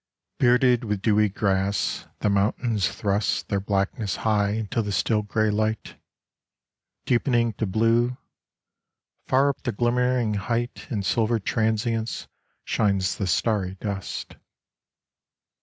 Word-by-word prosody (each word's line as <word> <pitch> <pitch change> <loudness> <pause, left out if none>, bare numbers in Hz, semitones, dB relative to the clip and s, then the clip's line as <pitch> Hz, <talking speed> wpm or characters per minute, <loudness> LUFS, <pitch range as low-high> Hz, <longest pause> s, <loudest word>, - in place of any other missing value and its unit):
BEARDED 125 -1 +4
with 105 -3 -3
dewy 105 -1 +3
grass 100 0 -1
the - - +2
mountains 105 +1 +1
thrust 100 0 -1
Their 100 - +1
blackness 100 +1 -1
high 105 -2 +2
into 110 +1 -1
the 105 -2 -3
still 105 +4 +1
grey 110 +1 0
light, 110 +1 -2 1.1
Deepening 120 -2 +2
to 110 - 0
blue: 115 +5 +2 1.1
far 135 +2 +4
up 140 - -4
the 120 - -2
glimmering 120 0 +1
height 115 +5 -2
In 105 -4 -2
silver 115 +4 +1
transience 110 +2 -1 0.4
shines 95 -2 +1
the 100 - -1
starry 95 0 0
dust. 100 -3 -5
110 Hz, 115 wpm, -25 LUFS, 100-120 Hz, 1.1 s, BEARDED